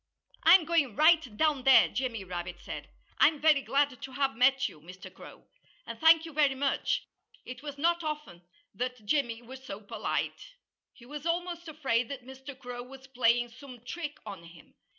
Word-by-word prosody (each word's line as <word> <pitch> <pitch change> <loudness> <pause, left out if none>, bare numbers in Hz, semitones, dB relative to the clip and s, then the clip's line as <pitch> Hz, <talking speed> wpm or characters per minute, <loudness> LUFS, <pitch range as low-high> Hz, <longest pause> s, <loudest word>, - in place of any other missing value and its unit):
"I'm 335 +1 +7
going 305 -9 +1
right 310 -7 +4
down 305 -4 +2
there," 265 0 +7
Jimmy 245 -5 -3
Rabbit 175 -1 -6
said. - - -8 0.3
"I'm 305 -2 +5
very 300 -2 +4
glad 280 -2 0
to 265 - -7
have 270 -1 0
met 270 +3 +3
you, 150 - -13
Mr. 180 +4 -12
Crow. - - -14 0.4
And - - -8
thank 320 0 +6
you, 325 - -9
very 285 -2 +3
much!" 275 +1 0 0.4
It 250 +1 -8
was 290 -1 -7
not 340 +3 +1
often 300 - -5 0.3
that 250 -3 -4
Jimmy 240 -2 0
was 260 +2 -11
so 195 -6 -7
polite. 210 - -4 0.4
He 240 - -17
was 295 +5 -7
almost 345 0 -2
afraid 265 -7 -1
that 270 -3 -7
Mr. 265 +1 -10
Crow 245 -2 -7
was 265 +2 -12
playing 240 -2 +2
some 250 0 -13
trick 295 +1 -5
on 200 -5 -8
him. 165 -1 -16
265 Hz, 175 wpm, -29 LUFS, 240-300 Hz, 0.4 s, I'm